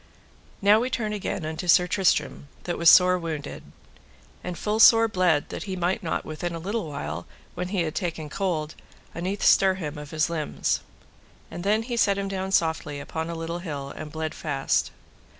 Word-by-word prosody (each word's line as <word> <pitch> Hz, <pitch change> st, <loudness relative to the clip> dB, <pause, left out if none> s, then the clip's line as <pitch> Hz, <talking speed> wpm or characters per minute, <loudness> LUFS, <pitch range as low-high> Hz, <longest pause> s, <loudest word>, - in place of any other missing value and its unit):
Now 210 Hz, +3 st, +5 dB
turn 220 Hz, -4 st, -2 dB
we 210 Hz, -, -2 dB
again 190 Hz, -3 st, -4 dB
unto 160 Hz, +3 st, -5 dB
Sir 180 Hz, +1 st, +6 dB
Tristram, 180 Hz, -5 st, 0 dB, 0.2 s
that 175 Hz, -, -3 dB
was 170 Hz, -1 st, +7 dB
sore 180 Hz, 0 st, +6 dB
wounded, 155 Hz, -4 st, -5 dB, 0.8 s
and 180 Hz, -1 st, -5 dB
full 210 Hz, +1 st, -1 dB
sore 225 Hz, 0 st, +8 dB
bled 180 Hz, -7 st, +1 dB
that -, -, -6 dB
he 190 Hz, -2 st, -4 dB
might 180 Hz, +4 st, -1 dB
not 170 Hz, -, -2 dB
within 170 Hz, +2 st, -4 dB
a -, -, -4 dB
little 195 Hz, +1 st, -3 dB
while, 140 Hz, -11 st, -5 dB, 0.3 s
when 180 Hz, -, -4 dB
he 185 Hz, -2 st, 0 dB
had 155 Hz, -2 st, -3 dB
taken 165 Hz, -5 st, -3 dB
cold, 155 Hz, -2 st, -2 dB, 0.4 s
unnethe 185 Hz, +4 st, -3 dB
stir 190 Hz, -1 st, +5 dB
him 155 Hz, -5 st, -5 dB
of 150 Hz, -1 st, -9 dB
his 155 Hz, 0 st, +1 dB
limbs. 160 Hz, -3 st, -1 dB, 0.7 s
And 175 Hz, -, -6 dB
then 215 Hz, +3 st, +2 dB
he 240 Hz, 0 st, -4 dB
set 200 Hz, -3 st, +3 dB
him 200 Hz, 0 st, -2 dB
down 190 Hz, 0 st, -3 dB
softly 160 Hz, -5 st, 0 dB
upon 160 Hz, +3 st, -5 dB
a 170 Hz, -, -4 dB
little 165 Hz, +1 st, -4 dB
hill, 145 Hz, -6 st, -6 dB
and 150 Hz, -, -7 dB
bled 160 Hz, 0 st, -4 dB
fast. 140 Hz, -3 st, -1 dB
175 Hz, 185 wpm, -25 LUFS, 155-195 Hz, 0.8 s, sore